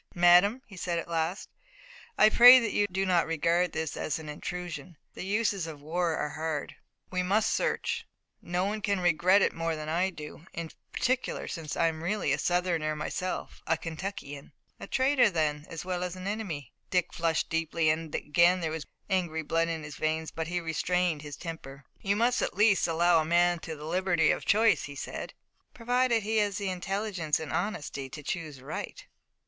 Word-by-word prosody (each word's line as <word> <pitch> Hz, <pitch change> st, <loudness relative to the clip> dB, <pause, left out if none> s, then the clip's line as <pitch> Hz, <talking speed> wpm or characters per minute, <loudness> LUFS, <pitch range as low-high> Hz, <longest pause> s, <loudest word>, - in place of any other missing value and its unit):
"Madame," 180 Hz, +8 st, +5 dB
he 200 Hz, -, -13 dB
said 175 Hz, -1 st, -2 dB
at 165 Hz, -, -4 dB
last, 165 Hz, +3 st, -2 dB, 0.7 s
"I 215 Hz, -, +6 dB
pray 245 Hz, +3 st, +10 dB
that 230 Hz, -4 st, +1 dB
you 205 Hz, -, +2 dB
do 190 Hz, +1 st, 0 dB
not 180 Hz, -3 st, +2 dB
regard 170 Hz, +2 st, +1 dB
this 160 Hz, -1 st, -3 dB
as -, -, -2 dB
an 160 Hz, -2 st, -8 dB
intrusion. 175 Hz, +2 st, -6 dB, 0.2 s
The -, -, -7 dB
uses 200 Hz, -3 st, 0 dB
of 155 Hz, -3 st, -8 dB
war 170 Hz, +1 st, 0 dB
are 150 Hz, -, -1 dB
hard. 155 Hz, 0 st, -4 dB, 0.4 s
We 185 Hz, 0 st, 0 dB
must 210 Hz, +4 st, +2 dB
search. -, -, -1 dB, 0.3 s
No 180 Hz, +2 st, -1 dB
one 210 Hz, +2 st, -2 dB
can 200 Hz, -2 st, 0 dB
regret 180 Hz, +3 st, +4 dB
it -, -, +2 dB
more 165 Hz, 0 st, -2 dB
than 155 Hz, 0 st, -6 dB
I 175 Hz, +4 st, +1 dB
do, 155 Hz, 0 st, -10 dB
in 165 Hz, -1 st, -5 dB, 0.2 s
particular 255 Hz, +1 st, -1 dB
since 160 Hz, -4 st, -5 dB
I -, -, +3 dB
am 160 Hz, -1 st, -1 dB
really 180 Hz, -5 st, 0 dB
a 145 Hz, -, -1 dB
Southerner 175 Hz, -4 st, 0 dB
myself, 180 Hz, +4 st, -4 dB
a 165 Hz, -, +2 dB
Kentuckian." 160 Hz, -4 st, -7 dB, 0.3 s
"A 200 Hz, -, -8 dB
traitor 260 Hz, -1 st, +3 dB
then 155 Hz, -4 st, -1 dB
as 165 Hz, 0 st, -6 dB
well 180 Hz, -1 st, -2 dB
as 180 Hz, 0 st, -4 dB
an 185 Hz, 0 st, -8 dB
enemy." 195 Hz, -, -4 dB, 0.2 s
Dick 180 Hz, -2 st, 0 dB
flushed 165 Hz, -1 st, 0 dB
deeply, 165 Hz, -1 st, +1 dB
and 155 Hz, 0 st, -3 dB
again 170 Hz, +4 st, +3 dB
there 165 Hz, -2 st, -2 dB
was 160 Hz, -1 st, -5 dB, 0.2 s
angry 175 Hz, -5 st, -1 dB
blood 165 Hz, +2 st, +1 dB
in 165 Hz, -2 st, -3 dB
his 150 Hz, -1 st, -8 dB
veins, 160 Hz, 0 st, -1 dB
but 160 Hz, -1 st, -4 dB
he 175 Hz, +1 st, -1 dB
restrained 170 Hz, 0 st, 0 dB
his 145 Hz, -2 st, -8 dB
temper. 145 Hz, -5 st, -8 dB, 0.2 s
"You 200 Hz, 0 st, +1 dB
must 240 Hz, +3 st, +2 dB
at -, -, -2 dB
least 205 Hz, -5 st, +4 dB
allow 170 Hz, +1 st, +3 dB
to -, -, +4 dB
a -, -, -3 dB
man 175 Hz, +1 st, +3 dB
the 160 Hz, -, -6 dB
liberty 165 Hz, +2 st, +1 dB
of -, -, -2 dB
choice," 220 Hz, +1 st, +4 dB
he 140 Hz, -, -9 dB
said. -, -, -6 dB, 0.4 s
"Provided 245 Hz, -1 st, +1 dB
he 220 Hz, +2 st, 0 dB
has 205 Hz, -3 st, +1 dB
the 200 Hz, -2 st, -2 dB
intelligence 185 Hz, -3 st, -1 dB
and 160 Hz, -, -6 dB
honesty 145 Hz, -8 st, -3 dB
to 150 Hz, +2 st, -9 dB
choose 155 Hz, -4 st, -5 dB
right." -, -, -6 dB
175 Hz, 190 wpm, -29 LUFS, 160-195 Hz, 0.7 s, pray